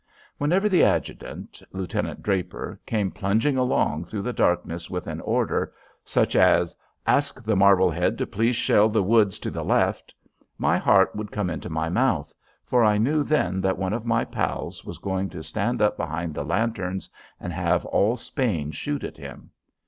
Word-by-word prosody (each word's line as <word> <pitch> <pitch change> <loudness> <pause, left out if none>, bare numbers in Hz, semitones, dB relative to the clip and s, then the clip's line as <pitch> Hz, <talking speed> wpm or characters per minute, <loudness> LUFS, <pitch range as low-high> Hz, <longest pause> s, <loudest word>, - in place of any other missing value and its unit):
Whenever 180 +8 +2
the 185 -4 +4
adjutant, - - -2
Lieutenant 95 -2 -3
Draper, 95 -4 -2
came 105 -4 0
plunging 110 +8 +1
along 125 -11 +1
through 100 +2 -5
the 125 - -2
darkness 85 -3 0
with 90 -1 -4
an 80 0 -5
order 115 +1 0 0.3
such - - +1
as: - - +4 0.3
"Ask 140 -3 +1
the 110 -1 +1
Marblehead 95 -3 +4
to - - -1
please 115 +4 0
shell 110 -1 +4
the 110 -2 +2
woods 105 -1 +3
to - - -5
the - - -4
left" - - +1 0.5
my - - +2
heart 95 -1 +4
would 105 0 -5
come 100 -4 -2
into 85 - -5
my 80 0 -1
mouth, 85 - 0 0.3
for 125 -2 +3
I 105 -1 +4
knew 145 +8 +2
then 95 -12 +1
that 95 0 +1
one 95 +1 -1
of 115 0 -2
my 115 -1 +1
pals - - -3
was - - -8
going 95 0 -2
to 80 -3 -8
stand 105 +8 -1
up 105 - +2
behind 80 +1 -3
the 75 - -3
lanterns 95 +2 -2 0.3
and 90 - -5
have 85 +1 0
all 110 +5 +2
Spain 105 - -2
shoot 145 - -4
at - - -6
him. - - -11
100 Hz, 175 wpm, -25 LUFS, 90-115 Hz, 0.5 s, the